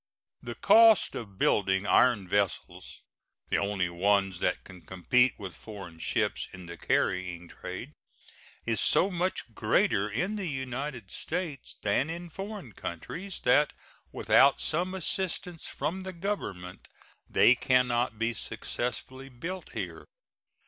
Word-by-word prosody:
The - - -6
cost 225 -2 +6
of 100 -4 -7
building 95 0 +2
iron 105 -3 +4
vessels, 95 -2 -2 0.5
the - - +3
only 100 -3 0
ones 95 +1 +1
that - - 0
can 95 -2 -13
compete 125 +9 +2
with 95 -5 -7
foreign 90 -1 -10
ships - - -1
in 90 -1 -9
the 85 0 -8
carrying 90 -2 -1
trade, - - -8 0.7
is 115 -2 0
so 195 - +4
much 180 -9 -2
greater 105 -1 +2
in 180 - -1
the 195 -3 -3
United 130 -5 -5
States 160 -6 -3
than 105 +8 +1
in 170 +1 -6
foreign 195 - -7
countries 175 - -6
that 145 +4 +4 0.4
without 115 +6 +4
some 180 +4 0
assistance 180 -1 -2
from 185 +4 -3
the 190 0 -6
Government 165 - -5 0.4
they 120 - +6
can 125 0 +3
not 120 -1 0
be 115 +1 0
successfully 130 +4 -5
built 170 +9 -6
here. - - -5
120 Hz, 130 wpm, -29 LUFS, -, 0.7 s, cost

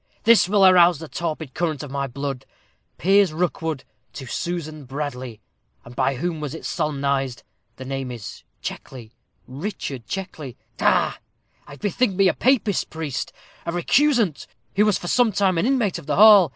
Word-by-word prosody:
"This 230 -5 +5
will 200 -1 +5
arouse 180 -2 +6
the 160 +2 -8
torpid 160 -4 -4
current 160 -3 -2
of 145 - -8
my 140 0 -2
blood 135 0 -5 0.5
'Piers 195 0 +4
Rookwood 160 -3 -2 0.3
to 135 - -7
Susan 155 +1 -4
Bradley.' 130 -4 -5 0.4
And 120 - -12
by 135 +1 +1
whom 165 +4 -3
was 150 0 -5
it - - -9
solemnized? 140 -3 -1 0.3
The 130 - -9
name 135 -1 -4
is 120 -4 -8 0.2
Checkley 120 -4 -7 0.4
Richard 140 - -6
Checkley. 155 -9 -6 0.2
Ha! - - +2 0.5
I - - -10
bethink 205 - 0
me 195 0 +4
a - - +3
Papist 235 -7 +1
priest 150 -4 -4 0.3
a - - -3
recusant 225 - +2 0.3
who 210 +2 +4
was 210 - +3
for 175 - -7
some 245 +3 +3
time 190 -3 +2
an 215 - +1
inmate 245 -8 +1
of - - -14
the 150 - 0
hall. 205 -4 +8
160 Hz, 165 wpm, -23 LUFS, 135-195 Hz, 0.5 s, hall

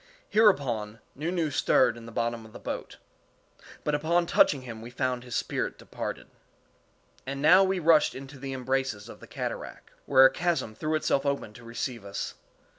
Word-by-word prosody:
Hereupon 125 - +2
Nu 155 +5 -3
Nu 170 -4 0
stirred 125 -3 +3
in 115 -1 -11
the - - -9
bottom 115 0 -2
of 110 -1 -15
the - - -9
boat; - - -6 0.9
but 150 - -1
upon 165 +4 +2
touching 140 -5 +3
him 115 -3 -8
we 115 - -8
found 125 0 -2
his 125 -2 -6
spirit - - -2
departed. - - -6 1.0
And 135 +1 -3
now 180 +7 +7
we 190 0 +1
rushed 160 -3 +4
into 135 +1 -9
the 135 0 -5
embraces 130 -4 -2
of - - -11
the - - -13
cataract, - - -6 0.2
where 135 -1 +7
a - - +6
chasm 170 -10 -1
threw 155 +7 -2
itself 140 -3 +1
open 140 -6 -2
to 125 - -13
receive 115 0 -4
us. 100 0 -5
135 Hz, 180 wpm, -28 LUFS, 115-155 Hz, 1.0 s, now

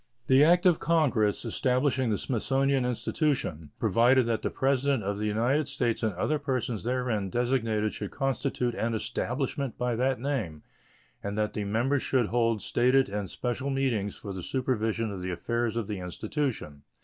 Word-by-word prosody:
The 135 +2 +6
act 175 +3 +5
of 175 -3 +5
Congress 130 -11 +2
establishing 130 +1 +1
the 105 - +1
Smithsonian 135 +3 +1
Institution 125 - -1
provided 120 +4 +4
that 115 -1 0
the - - -1
President 135 -2 +1
of 100 +1 -2
the 105 - -1
United 120 +8 +1
States 125 -5 -1
and 110 -2 +1
other 150 +12 0
persons 130 -6 -2
therein 120 -5 -1
designated 115 -2 0
should 105 - -5
constitute 135 -3 -1
an 115 0 -1
"establishment" 125 +4 -2
by 125 -1 0
that 130 0 +1
name, 115 - -3 0.6
and 100 +1 -4
that 105 -1 0
the 105 - -3
members 120 +7 +1
should 125 -5 +1
hold 115 -2 +1
stated 130 +1 +3
and 100 -2 -3
special 130 +3 -3
meetings 125 -7 0
for 100 - -7
the 95 - -5
supervision 115 -1 -1
of 95 -2 -6
the 90 - -3
affairs 115 +6 -1
of 115 -4 -2
the 105 -3 -4
Institution. 90 - -3
120 Hz, 165 wpm, -28 LUFS, 105-135 Hz, 0.6 s, The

